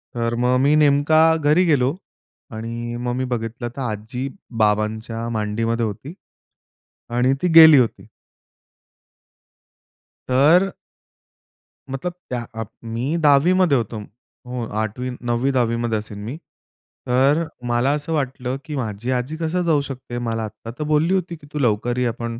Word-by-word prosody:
तर 115 0 -1
मग 125 +1 +3
मी 145 +2 +4
नेमका 150 +1 +4 0.2
घरी 155 +4 +3
गेलो 140 -2 +2 0.6
आणि 115 +1 -5
मग 120 0 -1
मी 130 - -1
बघितलं, 120 0 -4
तर 135 - -5
आजी 120 +3 -4 0.4
बाबांच्या 110 +2 -1
मांडीमध्ये 115 +2 -1
होती. 120 - -6 1.0
आणि 125 +3 +2
ती 180 - +2
गेली 160 -3 +10
होती. 120 - -1 2.2
तर 160 +9 +4 1.2
मतलब 155 +7 -4 0.2
त्या 120 -2 -3
अ, 115 0 -4 0.2
मी 120 +7 -2
10वीमध्ये 155 +2 +4
होतो. 115 -1 -3 0.5
हो, 125 -2 -4 0.2
8वी 125 +4 -3
9वी-10वीमध्ये 120 -2 0
असेन 105 -1 -8
मी, 120 +7 -5 0.7
तर 135 +6 +3
अ, - - -7 0.2
मला 120 +3 +2
असं 150 +2 -4
वाटलं, 130 -3 -2
की 150 - -5
माझी 120 -1 -3
आजी 130 +5 -2
कसं 165 +2 -1
जाऊ 155 -4 +2
शकते, 130 -3 -7
मला 115 -2 -2
आत्ता 110 +2 -8
तर - - -1
बोलली 160 +5 +3
होती 180 -2 -1
की 145 -2 -16
"तू 150 - -2
लवकर 120 0 0
ये, 125 -1 +1
आपण 115 0 -4
125 Hz, 140 wpm, -21 LUFS, 115-145 Hz, 2.2 s, गेली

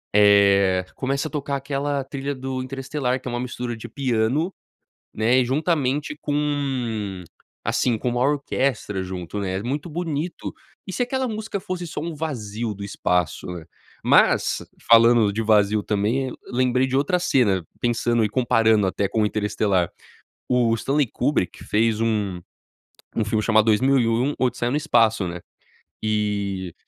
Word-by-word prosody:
eh, 100 -2 +5
começa 140 +3 -1
a - - -10
tocar 140 -2 -2
aquela 140 0 -2
trilha 140 +1 -4
do 130 0 -4
Interestelar 130 0 -2
que 130 - -10
é - - -3
uma 120 - -2
mistura 125 -1 -4
de 110 - -8
piano, 135 +6 0 0.6
né, 115 +4 +3
e - - +2
juntamente 145 +1 0
com, 130 -9 -2 0.4
assim, 120 -3 +1
com 125 - -2
uma 120 0 -1
orquestra 130 -7 0
junto, 90 +1 -5
né, 95 -1 -2
é - - -5
muito 140 +8 -3
bonito. 165 0 -4 0.3
E, 190 - -6
se 245 - 0
aquela 260 +1 -1
música 215 -2 -4
fosse 180 -1 -4
só 155 - -5
um 165 +1 -4
vazio 120 -8 -4
do 100 - -9
espaço, 90 -5 -1
né? 90 -2 -6 0.4
Mas, - - +3 0.2
falando 115 -2 +6
de 115 +3 -1
vazio, 105 -1 +3
também, 115 +6 0
lembrei 125 +1 +1
de 130 0 -1
outra 145 +6 +2
cena, 125 - +2 0.2
pensando 120 -1 +1
e - - +1
comparando 110 -3 +3
até 95 +1 0
com 110 - 0
o - - +3
Interestelar, 105 -4 0 0.6
o 120 -2 +3
Stanley 140 +4 +1
Kubrick 95 - -1
fez 110 0 +1
um 105 -5 0 0.8
um 110 - +1
filme 105 +1 0
chamado 110 -1 +4
2001 120 +3 +3
Odisseia 125 -1 0
no - - 0
Espaço, 115 -9 +2
né? 85 +1 -5 0.6
E 100 -4 -1
120 Hz, 150 wpm, -23 LUFS, 105-140 Hz, 0.8 s, falando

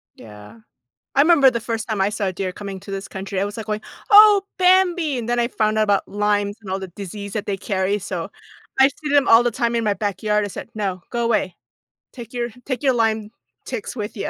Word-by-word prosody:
Yeah. 105 +1 -13 0.6
I 275 - +6
remember 290 -4 +6
the 235 -2 -3
first 225 -1 -4
time 215 -3 -1
I 195 - +2
saw 210 -1 -3
a 185 - -2
deer 185 0 -3
coming 195 0 -7
to 200 - -10
this 195 0 -5
country, 190 0 -5
I 195 - +1
was 205 - -6
like 220 - -5
going, 215 0 -2 0.3
"Oh, 415 -1 +9 0.2
Bambi" 360 -6 +3
and 235 0 -4
then 240 - +1
I 235 - +2
found 215 -2 0
out 215 - +4
about 205 -1 +1
Lyme 205 0 0
and 195 - -10
all 190 +1 -2
the 190 - -7
disease 200 +2 -8
that 210 -2 -3
they 200 - -1
carry, 195 +1 -1
so - - -5 0.5
I 270 - +7
see 300 +2 -7
them 285 -1 +4
all 225 +1 +7
the 240 - +1
time 235 +1 -1
in 230 - 0
my 205 - +2
backyard. 210 +1 -1
I - - -6
said, 230 - -8
"No, 195 -4 -3
go 235 -1 -1
away. 215 -6 0 0.6
Take 240 -2 -10
your 240 0 -2 0.2
take 260 -3 -3
your 265 -3 +3
Lyme 220 -2 0 0.4
ticks 420 - -5
with 210 -1 -5
ya." 195 - -3
215 Hz, 240 wpm, -21 LUFS, 200-240 Hz, 0.6 s, Oh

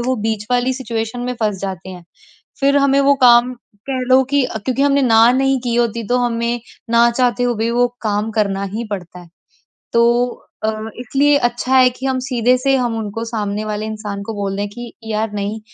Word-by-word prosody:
वो 255 +2 0
बीच 215 -1 -2
वाली 250 +1 +2
सिचुएशन 235 -2 -4
में 250 +1 -3
फँस 210 -3 0
जाते 190 -3 -5
हैं। 180 -2 -10 0.6
फिर 280 +1 +3
हमें 280 0 +3
वो 280 0 +4
काम 240 +1 +6 0.4
कह 260 -1 -1
लो 260 +1 +6
कि 285 -1 +3 0.2
क्योंकि 260 +1 0
हमने 280 0 +3
ना 230 -1 +5
नहीं 270 +1 +2
की 240 -1 -1
होती, 235 -1 0
तो 245 - +2
हमें 235 0 -1 0.3
ना 235 0 +5
चाहते 245 0 0
हुए 245 -1 +1
भी 225 +2 -1
वो 245 +1 +3 0.2
काम 210 0 -1
करना 200 -3 0
ही 230 +2 -3
पड़ता 180 -3 -6
है। 175 - -15 0.6
तो 235 0 +4 0.6
अ, - - +2 0.3
इसलिए 280 +4 +2
अच्छा 240 +2 0
है 255 -1 +6
कि 255 +2 -6
हम 260 -1 0
सीधे 250 -1 +2
से 270 +1 +1
हम 240 -3 -1
उनको 220 +1 -4
सामने 215 -2 -3
वाले 215 0 -3
इंसान 210 -2 -5
को 225 - -4
बोल 200 -1 -3
दें 205 0 -2
कि 240 +3 -9
यार 220 -1 -2
नहीं, 205 +2 -3
235 Hz, 200 wpm, -18 LUFS, 215-255 Hz, 0.6 s, काम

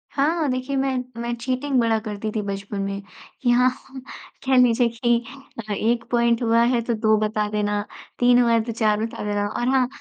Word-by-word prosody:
हाँ। 305 +3 +1
देखिए 255 +2 -3
मैं 270 -1 0 0.2
मैं 235 0 -2
चीटिंग 255 +3 -1
बड़ा 230 -1 +2
करती 215 0 -5
थी 215 - 0
बचपन 200 0 -5
में, 195 0 -3 0.4
कि 245 - +1
हाँ, 250 +1 +4 0.8
कह 265 0 +3
लीजिए 245 -1 +4
कि 235 0 +1 0.5
अ, 205 - 0
एक 230 +3 0
पॉइंट 235 0 +2
हुआ 230 0 +3
है 235 - +2
तो 235 +1 -2
दो 215 -1 +2
बता 215 0 -1
देना, 210 -1 -1 0.4
3 245 0 +5
हुआ 235 - +3
है 230 -1 +4
तो 230 - -4
4 215 -2 +1
बता 225 - -7
देना। 205 0 -1
और 240 +4 -3
हाँ, 260 -1 +3
235 Hz, 200 wpm, -23 LUFS, 215-250 Hz, 0.8 s, 3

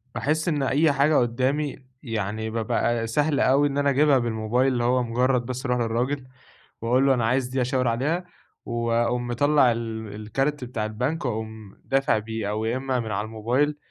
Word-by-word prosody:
باحسّ 155 +4 0
إن 150 -4 +1
أي 150 +3 +3
حاجة 140 +2 +3
قدّامي 130 +5 +1 0.3
يعني 110 -2 -3
بابقى 115 +1 0
سهل 145 +5 +1
أوي 140 +3 +4
إن 140 0 -3
أنا 145 0 +2
أجيبها 140 0 +4
بالموبايل، 120 +2 0
اللي 120 -1 0
هو 125 +1 +2
مجرّد 125 +1 +1
بس 130 +2 -5
أروح 125 -1 +1
للراجل 125 +4 -1 0.5
وأقول 125 +4 +2
له 135 - +5
أنا 120 -3 0
عايز 125 +2 +1
دي، 130 0 -1
أشاور 125 0 0
عليها، 150 +10 0 0.4
واقوم 120 +1 0
مطلّع 140 +1 +3
ال 110 -2 -5
الكارت 135 +7 -2
بتاع 120 -3 -3
البنك 125 +9 -2
واقوم 110 -3 -5
دافع 135 -3 +2
بيه، 110 -1 -4
أو 110 +1 -2
يا 115 +3 0
إمّا 130 -1 -1
من 110 -2 -4
على 105 +1 -1
الموبايل، 120 +7 0
125 Hz, 175 wpm, -25 LUFS, 115-135 Hz, 0.5 s, له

